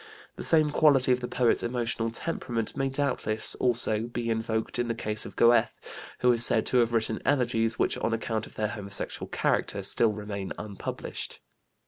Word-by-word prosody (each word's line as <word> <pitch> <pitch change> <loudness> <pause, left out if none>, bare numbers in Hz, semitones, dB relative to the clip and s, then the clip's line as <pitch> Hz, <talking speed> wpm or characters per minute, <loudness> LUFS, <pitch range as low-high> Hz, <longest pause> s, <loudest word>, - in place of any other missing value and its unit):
The - - -7
same 155 -2 +3
quality 140 -4 +4
of 125 - +3
the 125 - -4
poet's 120 -2 +1
emotional 120 -1 -2
temperament 115 -3 -3
may 135 0 0
doubtless, 135 -6 +1
also, 115 -3 +1
be 120 -1 -3
invoked 110 +1 -2
in 120 - 0
the 115 - -2
case 105 -1 -3
of - - -12
Goethe, 120 0 +3 0.4
who 125 - +5
is 120 -1 +3
said - - +4
to 125 - +1
have 120 -1 +3
written 110 -1 -1
elegies 120 -4 +1
which, - - 0
on - - -1
account 110 -1 -2
of - - -16
their 105 -1 -1
homosexual 100 -2 -4
character, - - -1
still 115 -2 +3
remain 100 -2 -5
unpublished. 100 -2 -6
115 Hz, 175 wpm, -27 LUFS, 110-125 Hz, 0.4 s, who